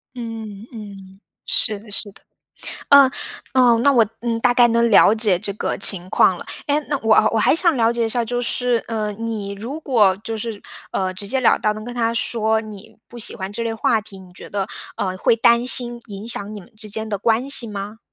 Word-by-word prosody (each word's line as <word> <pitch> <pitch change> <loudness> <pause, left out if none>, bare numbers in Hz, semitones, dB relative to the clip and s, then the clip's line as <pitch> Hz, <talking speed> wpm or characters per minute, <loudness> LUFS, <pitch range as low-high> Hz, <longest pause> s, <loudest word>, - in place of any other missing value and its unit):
嗯， 225 -3 -8
嗯。 195 -3 -11 0.3
是 210 -2 +1
的 215 0 -16
是 205 0 -1
的。 - - -20 0.7
呃， 280 -2 +7 0.4
呃， 245 -3 +4
那 280 - +5
我， 235 -3 +5 0.2
嗯， 230 -1 -2
大 245 0 +2
概 245 -1 +6
能 235 0 +2
了 205 +1 +6
解 210 -5 +2
这 200 - -4
个 - - -3
情 185 -2 +3
况 185 -1 +3
了。 - - -9 0.2
哎， 290 +1 +1
那 285 - 0
我 220 -1 +3 0.2
我 225 - +1
还 215 - +3
想 335 -3 +3
了 230 -1 +2
解 235 -1 -1
一 - - -3
下， 235 +1 0
就 245 +1 -3
是， 245 -1 0
呃， 215 -2 -3
你 215 -2 -5
如 235 +10 -7
果 215 -10 +2
就 225 -1 -4
是， 215 -1 -6 0.3
呃， 185 -1 -2
直 195 +2 -5
截 265 +6 0
了 240 - +3
当 210 0 0
能 215 0 -8
跟 245 - -7
他 230 -1 -1
说 220 -1 0
你 210 -3 -12
不 240 - -11
喜 220 - -1
欢 190 +1 -6
这 230 - -4
类 225 -1 -3
话 220 0 +1
题， 200 -2 -13
你 185 -1 -15
觉 180 - -12
得 200 -1 -3 0.3
呃， 185 -1 -2
会 230 - +2
担 235 +2 +3
心 240 -2 +3
影 205 0 -9
响 215 -2 -2
你 205 - -8
们 180 - -18
之 215 -1 -6
间 220 +2 -3
的 205 -2 -3
关 230 +5 0
系 245 -4 +4
吗？ 205 +1 -7
225 Hz, 240 characters per minute, -20 LUFS, 205-235 Hz, 0.7 s, 呃